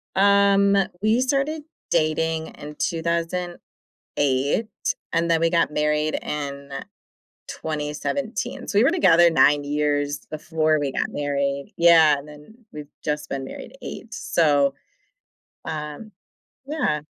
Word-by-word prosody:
Um, 200 0 +4 0.3
we 220 +4 +3
started 280 +3 0 0.3
dating 160 0 0
in 150 +1 -10
2008 170 - -2 0.4
and 170 0 +1
then 165 -1 +3
we 165 - +2
got 165 -3 +2
married 150 +1 0
in 140 -1 -5 0.8
2017, 215 - -4
so 200 - +1
we 230 - +5
were 275 - +5
together 175 - +5
9 145 -2 +4
years 145 0 -1
before 155 0 0
we 140 -2 -2
got - - -1
married. 140 -1 -2
Yeah, 160 -4 +6
and 140 - -11
then 150 +11 -15
we've 150 -1 -8 0.2
just 150 0 -2
been 135 -1 -4
married - - -9
8, 230 - -8
so, 145 -7 +2 0.9
um 150 +7 -6 0.6
Yeah. 285 - -1
155 Hz, 120 wpm, -23 LUFS, 145-195 Hz, 0.9 s, Yeah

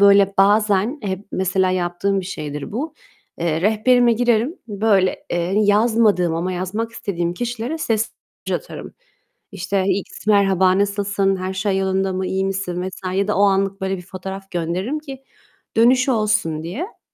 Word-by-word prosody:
böyle 200 -1 +6
bazen 210 +5 +3
Hep 195 0 -4
mesela 190 0 +1
yaptığım 185 +2 0
bir 180 - -7
şeydir 150 -3 -6
bu, 300 +7 -4 0.4
eee, 165 -1 0
rehberime 235 +4 +4
girerim. 240 - +1
Böyle, 200 -2 +1
eee, 175 +1 -1
yazmadığım 210 -4 +3
ama 175 +3 -2
yazmak 200 +6 -3
istediğim 175 -6 -3
kişilere 240 - -3
sesli 225 -5 -1 0.3
mesaj - - -1
atarım. - - -9 0.6
İşte, 195 0 -1
"X 195 +2 -3
merhaba, 190 -2 +4
nasılsın? 200 -1 +1
Her 185 0 -3
şey 195 0 0
yolunda 190 0 0
mı? 185 0 -2
İyi 190 0 -1
misin?" 185 -2 -3
vs. 190 - -10
ya 200 +1 0
da 210 - +1
o - - +4
anlık 195 0 +1
böyle 190 0 -1
bir 180 - -9
fotoğraf 190 +1 -8
gönderirim 180 - -2
ki 270 -3 -10 0.5
dönüş 250 +4 +4
olsun 215 -10 +1
diye. 245 - -6
195 Hz, 155 wpm, -20 LUFS, 185-220 Hz, 0.6 s, böyle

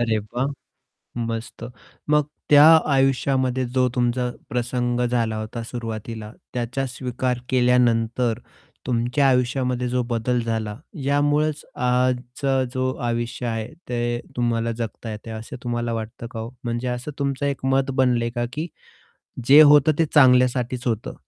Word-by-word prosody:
अरे 115 -2 +1
वाह! 120 +5 -3 0.8
मस्त. 115 +1 -5 0.5
मग 150 -1 +4 0.3
त्या 145 0 +8 0.3
आयुष्यामध्ये 130 -1 +1
जो 130 -1 +3
तुमचा 125 0 0 0.2
प्रसंग 120 0 -1
झाला 115 -2 0
होता 110 +2 -5
सुरुवातीला, 115 -2 -6 0.2
त्याचा 125 +2 -2
स्वीकार 125 -1 -2
केल्यानंतर, 120 -2 +2 0.5
तुमच्या 125 +3 +1
आयुष्यामध्ये 125 0 +1
जो 125 0 0
बदल 120 +1 0
झाला, 110 -2 -3 0.3
यामुळेच 145 +2 +1
आजचा 125 +2 0
जो 130 0 0
आयुष्य 120 +1 -2
आहे, 115 -1 -3 0.2
ते 120 0 -1 0.2
तुम्हाला 115 -1 0
जगता 115 0 -5
येतंय, 110 +1 -7
असं 110 +2 -7
तुम्हाला 120 -1 -2
वाटतं 115 +1 -5
का 115 - -6
हो? 115 - -5 0.2
म्हणजे 120 +1 -2
असं 125 +4 -4
तुमचं 140 0 -1
एक 140 -2 -3
मत 135 0 +2
बनलंय 125 -3 +2
का, 120 - -1
की 155 +3 -3 0.8
जे 145 +3 +9
होतं 150 0 +7
ते 165 - +4
चांगल्यासाठीच 125 -2 +4
होतं? 115 -2 -2
125 Hz, 135 wpm, -23 LUFS, 115-130 Hz, 0.8 s, जे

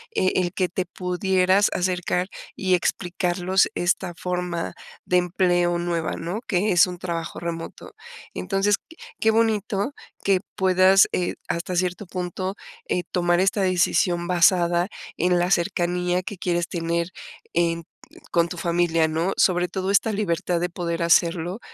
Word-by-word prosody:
eh, 185 - +2
el 180 -1 +1
que 185 -2 0
te 185 +1 -2
pudieras 185 +2 +2
acercar 180 0 0 0.3
y 185 -1 0
explicarlos 180 +1 0
esta 175 0 0
forma 180 -1 -3 0.3
de 180 - +2
empleo 175 -1 +2
nueva, 170 -2 -2
¿no? 175 +7 -4
Que 200 +2 +1
es 180 +1 +6
un 180 - -6
trabajo 170 -2 -4
remoto. 170 - -6 0.4
Entonces, 195 0 +1
q 325 - -19 0.2
qué 220 - +3
bonito 220 +1 0 0.3
que 195 -2 +3 0.2
puedas, 190 0 +5
eh, 180 - -1
hasta 170 +2 -3
cierto 180 +3 -1
punto, 185 +1 -4 0.3
eh, 180 - 0
tomar 175 -1 +2
esta 195 +2 +2
decisión 175 -1 +2
basada 175 0 +3 0.3
en 180 +1 +2
la 175 +1 +1
cercanía 180 -1 +1
que 200 +1 -6
quieres 175 0 -1
tener 170 0 -2 0.4
en 170 0 +1 0.5
con 170 0 +2
tu 180 - -6
familia, 170 -1 +1
¿no? 165 +4 -1
Sobre 180 -1 +3
todo, 190 +1 -3
esta 200 +3 +3
libertad 180 -4 -1
de 175 +1 -1
poder 170 -1 -3
hacerlo, 170 +2 +2
180 Hz, 145 wpm, -24 LUFS, 175-185 Hz, 0.5 s, es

